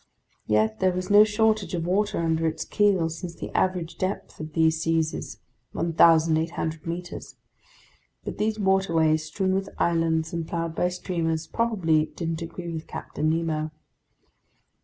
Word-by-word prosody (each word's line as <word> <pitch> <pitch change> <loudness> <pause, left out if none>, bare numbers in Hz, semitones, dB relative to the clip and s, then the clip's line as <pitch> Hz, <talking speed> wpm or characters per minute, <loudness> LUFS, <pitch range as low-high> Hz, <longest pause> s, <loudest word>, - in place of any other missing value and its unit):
Yet 110 0 +2
there 185 - +3
was 185 +2 -3
no 205 +1 +9
shortage 215 -2 +1
of 165 -1 -2
water 205 +4 +1
under 165 -1 +1
its 160 0 -3
keel, 200 -5 +2
since 165 +1 -6
the - - -7
average 175 -3 0
depth 190 +2 -3
of 155 0 -7
these 160 0 +2
seas 165 -1 +1
is - - -6 0.4
1,800 165 -1 +2
meters; 175 +1 -6 0.9
but - - -6
these 215 +1 0
waterways, 170 -6 +2
strewn 190 +4 -1
with 195 +1 -1
islands 165 -1 +1
and 165 -1 -3
plowed 165 -1 -3
by 180 +2 +1
steamers, 165 -3 -2
probably 170 -9 +1
didn't 165 0 -4
agree 170 +1 -6
with 160 0 -6
Captain 155 - -3
Nemo. 160 -1 -1
165 Hz, 145 wpm, -25 LUFS, 160-185 Hz, 0.9 s, no